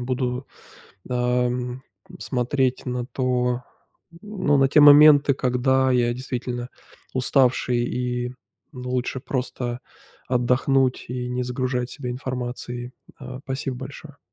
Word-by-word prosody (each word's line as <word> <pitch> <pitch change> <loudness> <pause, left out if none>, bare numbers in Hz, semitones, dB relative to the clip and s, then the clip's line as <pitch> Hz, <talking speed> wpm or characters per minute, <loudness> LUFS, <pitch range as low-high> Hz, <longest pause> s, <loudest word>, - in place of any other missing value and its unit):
буду, 125 +1 -2 0.6
ам, 125 0 0 0.4
смотреть 130 0 -1
на 125 -1 -2
то, 125 -1 0 0.6
ну, 200 -9 0
на 135 0 +4
те 150 - +5
моменты, 145 -1 +8
когда 130 +1 +2
я 120 -1 +2
действительно 125 -1 -4 0.4
уставший, 130 -1 +2
и, 125 0 -3 0.4
ну, 125 -1 -7
лучше 125 +1 -2
просто 125 -2 -3 0.5
отдохнуть, 130 +1 +1
и 125 0 -4
не 125 0 -2
загружать 125 0 -2
себя 125 -4 -5
информацией. 125 -1 -5 0.3
А, 130 -1 -8
спасибо 135 -1 -4
большое! 140 +3 -10
125 Hz, 110 wpm, -23 LUFS, 125-130 Hz, 0.6 s, моменты